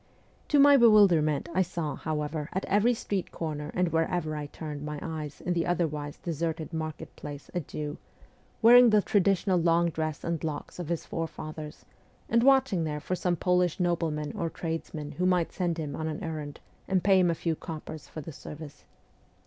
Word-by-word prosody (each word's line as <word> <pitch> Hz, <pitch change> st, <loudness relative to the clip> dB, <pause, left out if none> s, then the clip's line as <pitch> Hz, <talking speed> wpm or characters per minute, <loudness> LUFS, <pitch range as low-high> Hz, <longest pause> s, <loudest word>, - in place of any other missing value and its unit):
To 295 Hz, -, +3 dB
my 285 Hz, 0 st, +8 dB
bewilderment 190 Hz, -, +5 dB
I 185 Hz, -, +3 dB
saw, 170 Hz, -4 st, -2 dB
however, 150 Hz, 0 st, -3 dB
at 190 Hz, -, -2 dB
every 210 Hz, +5 st, +3 dB
street 200 Hz, -4 st, -3 dB
corner 150 Hz, -2 st, -4 dB
and 180 Hz, -1 st, +2 dB
wherever 165 Hz, -1 st, 0 dB
I 150 Hz, -1 st, -4 dB
turned 150 Hz, -1 st, -7 dB
my 150 Hz, 0 st, -4 dB
eyes 155 Hz, -2 st, -6 dB
in 180 Hz, -, -1 dB
the 170 Hz, 0 st, 0 dB
otherwise 150 Hz, -4 st, -1 dB
deserted 165 Hz, 0 st, -3 dB
market 155 Hz, -1 st, -5 dB
place 145 Hz, -1 st, -9 dB
a 180 Hz, -, 0 dB
Jew, 150 Hz, -1 st, -6 dB, 0.6 s
wearing 245 Hz, +1 st, +9 dB
the 210 Hz, -2 st, +4 dB
traditional 195 Hz, -2 st, +2 dB
long 170 Hz, 0 st, +3 dB
dress 155 Hz, -1 st, -3 dB
s -, -, -24 dB
and 170 Hz, -1 st, -2 dB
locks 155 Hz, +2 st, -5 dB
of 170 Hz, -3 st, -5 dB
his 170 Hz, -2 st, -2 dB
forefathers, 155 Hz, -2 st, -6 dB, 0.4 s
and 235 Hz, -, +3 dB
watching 260 Hz, -9 st, +4 dB
there 150 Hz, -1 st, -2 dB
for 165 Hz, -, -4 dB
some 180 Hz, -1 st, 0 dB
Polish 180 Hz, 0 st, +1 dB
nobleman 165 Hz, -4 st, 0 dB
or 165 Hz, -, -1 dB
tradesman 160 Hz, -3 st, -5 dB
who 180 Hz, +1 st, 0 dB
might 180 Hz, -2 st, +2 dB
send 175 Hz, -3 st, -1 dB
him 150 Hz, -3 st, -4 dB
on 160 Hz, -, -3 dB
an 155 Hz, -1 st, -4 dB
errand 155 Hz, -3 st, -5 dB, 0.3 s
and 190 Hz, -2 st, +1 dB
pay 195 Hz, -1 st, +5 dB
him 180 Hz, -1 st, +4 dB
a 165 Hz, -, +1 dB
few 165 Hz, 0 st, -1 dB
coppers 155 Hz, -1 st, -8 dB
for 155 Hz, -, -7 dB
the 155 Hz, -, -8 dB
service. 150 Hz, 0 st, -10 dB
165 Hz, 185 wpm, -28 LUFS, 155-180 Hz, 0.6 s, wearing